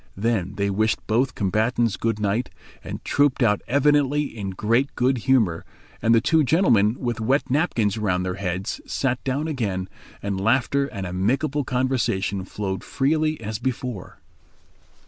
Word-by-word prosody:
Then 100 -3 -1
they 100 0 0
wished 110 +3 0
both 125 +4 +1
combatants 110 +3 +1
good 115 -2 -1
night, 105 +4 0 0.3
and - - -7
trooped 145 -2 +2
out 105 -3 +2
evidently 145 +1 +3
in 100 -3 -4
great 115 +8 0
good 125 +1 +2
humour 105 -11 +3 0.4
and 115 +1 +4
the - - +6
two 160 +8 +3
gentlemen, 120 - +3
with 120 -3 -2
wet 130 +3 +1
napkins 115 - +1
round 90 -3 0
their 90 - -2
heads, 95 +2 -3
sat 130 -2 -1
down 140 +4 -1
again, 100 -11 -2 0.4
and 100 -1 -2
laughter 130 +5 +2
and 100 -7 -6
amicable 130 +11 0
conversation 125 -7 -1
flowed 95 -1 -4
freely 155 +3 0
as 110 -1 -4
before. 125 -5 -4
115 Hz, 145 wpm, -23 LUFS, 100-135 Hz, 0.4 s, the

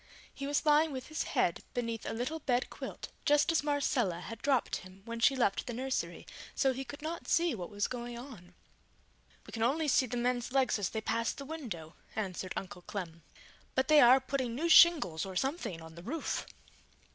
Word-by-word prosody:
He 275 - -5
was 290 +2 0
lying 305 +1 +5
with 260 0 -6
his 310 - -2 0.2
head - - +2
beneath 230 -2 -3
a - - -2
little 255 +8 -3
bed 250 -4 0
quilt, - - -7
just 295 +1 +4
as 330 - +2
Marcella 270 - 0
had 230 +4 -8
dropped 275 -3 +1
him 185 +1 -13
when 230 0 -5
she 270 +4 +4
left 235 -6 +1
the 240 - -3
nursery; 260 +2 -3 0.3
so 270 -2 +2
he 265 +2 -4
could 285 +4 -10
not 330 +2 -5
see 340 -1 +3
what 180 -6 -5
was 205 0 -1
going 240 -1 -5
on. 220 -9 -11 0.9
"We - - -12
can 225 - -5
only 295 +7 +2
see 260 -2 +3
the 245 - -3
men's 245 0 0
legs 265 -4 +2
as 195 - 0
they 220 - -3
pass 230 +1 0
the 280 - -8
window," 220 - -6 0.2
answered 185 -3 -3
Uncle 180 -2 -6
Clem. 170 -3 -6 0.5
"But 260 +2 +1
they 305 -1 +8
are 250 +2 +8
putting 260 -3 -2
new 330 +6 -1
shingles 295 - +7
or 190 -1 -6
something 265 - -2
on 160 0 -11
the 170 - -10
roof!" 290 - -3
245 Hz, 200 wpm, -32 LUFS, 205-285 Hz, 0.9 s, they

